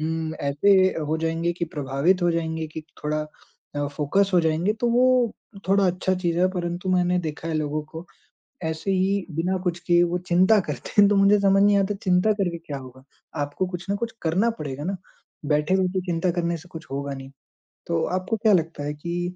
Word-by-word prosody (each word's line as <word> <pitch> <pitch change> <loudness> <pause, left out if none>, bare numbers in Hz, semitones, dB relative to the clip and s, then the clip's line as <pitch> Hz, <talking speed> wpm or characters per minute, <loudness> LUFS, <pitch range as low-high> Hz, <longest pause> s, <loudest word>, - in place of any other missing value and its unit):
उम, 160 0 -2
ऐसे 185 +7 +3
अ, - - -4
हो 155 +1 -1
जाएँगे 165 +1 -1
कि 170 0 -3
प्रभावित 145 +7 +1
हो 175 - +3
जाएँगे 160 -1 -2
कि 155 0 -7 0.2
थोड़ा 155 0 0 0.6
अ, 145 0 0
फोकस 155 +8 +1
हो 175 - +6
जाएँगे, 165 +5 +1
तो 235 +2 -1
वो 250 -1 +3 0.4
थोड़ा 195 0 +4
अच्छा 180 +1 0
चीज़ 175 -2 -1
है। 185 +1 +4
परंतु 175 0 -3
मैंने 180 0 +2
देखा 160 0 -5
है 160 - -2
लोगों 155 0 -1
को, 160 +3 -10 0.6
ऐसे 160 +4 -2
ही 190 0 +1
बिना 180 +3 0
कुछ 175 -2 -1
किए 175 0 +5
वो 175 - 0
चिंता 185 +5 +5
करते 150 - -5
हैं, 200 - +8
तो 205 - +3
मुझे 200 +1 +5
समझ 195 0 +4
नहीं 205 0 +5
आता 200 +1 +1
चिंता 185 +2 +3
करके 180 -5 -2
क्या 150 -4 -7
होगा? 130 0 -12 0.4
आपको 145 +6 -2
कुछ 180 0 -6
न 200 - +1
कुछ 230 +1 -3
करना 185 +8 +2
पड़ेगा 145 -1 -5
ना, 195 +1 -2 0.5
बैठे-बैठे 180 +5 +1
चिंता 175 +1 0
करने 170 -1 -1
से 175 +3 -15
कुछ 160 -2 -9
होगा 140 +1 -3
नहीं। 135 0 -9 0.6
तो 165 -1 0
आपको 220 +4 -2
क्या 215 0 +3
लगता 165 -4 0
है 145 +1 -3
कि 175 +3 -4
175 Hz, 200 wpm, -24 LUFS, 155-190 Hz, 0.6 s, हैं